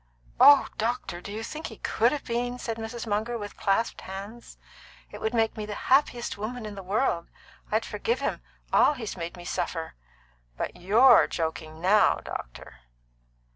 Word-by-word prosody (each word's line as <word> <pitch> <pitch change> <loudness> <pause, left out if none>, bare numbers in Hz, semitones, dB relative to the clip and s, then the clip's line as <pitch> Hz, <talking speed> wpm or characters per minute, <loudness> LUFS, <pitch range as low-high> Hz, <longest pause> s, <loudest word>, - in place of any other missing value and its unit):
"Oh 280 +2 +8
doctor, 225 -6 -2
do 200 - -8
you 220 +2 -5
think 310 +7 -6
he - - -10
could - - +2
have 295 - -3
been?" 245 +1 -2
said 230 -2 -4
Mrs. 225 +1 -5
Munger, 220 +3 -1
with 205 -2 -7
clasped 215 +4 0
hands. 200 +5 -9 0.5
"It - - -9
would 220 +2 -1
make 225 -1 +2
me 215 - -5
the 210 - -5
happiest 250 -4 +1
woman 225 +2 -4
in 210 - -6
the 200 - -7
world! 190 -2 0 0.4
I'd - - +1
forgive 465 +1 -1
him - - -2 0.3
all - - +5
he's 235 -7 -6
made 170 0 -6
me 175 - -10
suffer. 175 -2 -3 0.6
But - - -3
you're 210 +9 +6
joking 160 -1 -4
now, 205 +4 +5
doctor?" - - -8
220 Hz, 170 wpm, -27 LUFS, 190-240 Hz, 0.6 s, Oh